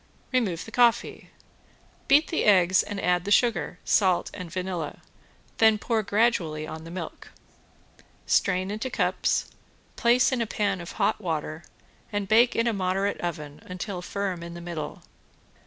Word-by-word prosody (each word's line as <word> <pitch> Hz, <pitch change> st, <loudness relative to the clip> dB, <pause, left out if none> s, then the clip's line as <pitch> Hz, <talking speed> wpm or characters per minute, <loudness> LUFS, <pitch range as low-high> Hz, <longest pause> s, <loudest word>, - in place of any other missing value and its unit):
Remove 210 Hz, -10 st, 0 dB
the 225 Hz, -, -11 dB
coffee. 240 Hz, -1 st, +2 dB, 0.8 s
Beat 285 Hz, +3 st, +5 dB
the 325 Hz, -, 0 dB
eggs 185 Hz, -3 st, +5 dB
and 205 Hz, -1 st, -5 dB
add 180 Hz, -2 st, +1 dB
the 200 Hz, -, -4 dB
sugar, 225 Hz, -4 st, +2 dB
salt 185 Hz, -4 st, +2 dB
and 180 Hz, -4 st, -8 dB
vanilla, 180 Hz, -4 st, -4 dB, 0.6 s
then 220 Hz, -1 st, +6 dB
pour 225 Hz, +2 st, 0 dB
on 215 Hz, -, -3 dB
gradually 195 Hz, -9 st, +1 dB
the 160 Hz, +1 st, -8 dB
milk. 170 Hz, -2 st, -7 dB, 1.0 s
Strain 185 Hz, 0 st, +1 dB
into 215 Hz, +5 st, -3 dB
cups, -, -, 0 dB, 0.5 s
place 245 Hz, +2 st, +4 dB
in 255 Hz, -2 st, 0 dB
a 230 Hz, -, -1 dB
pan 200 Hz, -4 st, -1 dB
of 170 Hz, -, -8 dB
hot 215 Hz, -, 0 dB
water, 160 Hz, -3 st, -3 dB, 0.5 s
and 205 Hz, -2 st, -2 dB
bake 230 Hz, +4 st, +4 dB
in 230 Hz, -, +2 dB
a 235 Hz, -, +1 dB
moderate 195 Hz, +1 st, -1 dB
oven 150 Hz, -4 st, -5 dB
until 180 Hz, 0 st, -5 dB
firm 190 Hz, -1 st, -3 dB
in 170 Hz, 0 st, -8 dB
the -, -, -7 dB
middle. 170 Hz, -3 st, -6 dB
190 Hz, 155 wpm, -26 LUFS, 175-220 Hz, 1.0 s, then